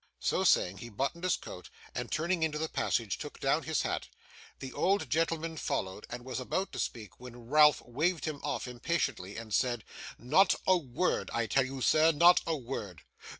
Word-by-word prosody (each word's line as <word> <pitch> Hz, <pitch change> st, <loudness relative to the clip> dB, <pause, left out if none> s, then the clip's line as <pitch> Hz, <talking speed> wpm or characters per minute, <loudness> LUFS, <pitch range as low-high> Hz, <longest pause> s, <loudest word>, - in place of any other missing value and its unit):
So -, -, 0 dB
saying, 90 Hz, +2 st, +3 dB
he 120 Hz, -, -8 dB
buttoned 135 Hz, -, -3 dB
his 185 Hz, -, +2 dB
coat, 90 Hz, -, -10 dB, 0.2 s
and -, -, -4 dB
turning 170 Hz, +2 st, 0 dB
into 155 Hz, -1 st, 0 dB
the 160 Hz, +1 st, -1 dB
passage, 115 Hz, -, -1 dB
took -, -, -8 dB
down -, -, +2 dB
his -, -, -1 dB
hat. -, -, -2 dB, 0.5 s
The 130 Hz, -1 st, -8 dB
old 195 Hz, +2 st, +1 dB
gentleman 165 Hz, 0 st, 0 dB
followed, 95 Hz, -7 st, -3 dB
and 120 Hz, +1 st, -7 dB
was 130 Hz, 0 st, -4 dB
about 185 Hz, +9 st, -2 dB
to -, -, -6 dB
speak, 110 Hz, -3 st, -5 dB
when 120 Hz, -1 st, -11 dB
Ralph 150 Hz, 0 st, +6 dB
waved 155 Hz, +7 st, 0 dB
him 155 Hz, -3 st, -3 dB
off 145 Hz, -2 st, -2 dB
impatiently, 125 Hz, -, -2 dB
and 110 Hz, -2 st, -7 dB
said: 120 Hz, -2 st, +1 dB, 0.3 s
'Not 160 Hz, +11 st, +4 dB
a 185 Hz, -, +5 dB
word. 170 Hz, +1 st, -1 dB
I 115 Hz, -, +1 dB
tell 130 Hz, +3 st, +2 dB
you, 135 Hz, 0 st, -6 dB
sir, 155 Hz, +5 st, +5 dB
not 170 Hz, +3 st, +6 dB
a 165 Hz, -2 st, 0 dB
word. 115 Hz, -, -6 dB
135 Hz, 190 wpm, -31 LUFS, 120-165 Hz, 0.5 s, Ralph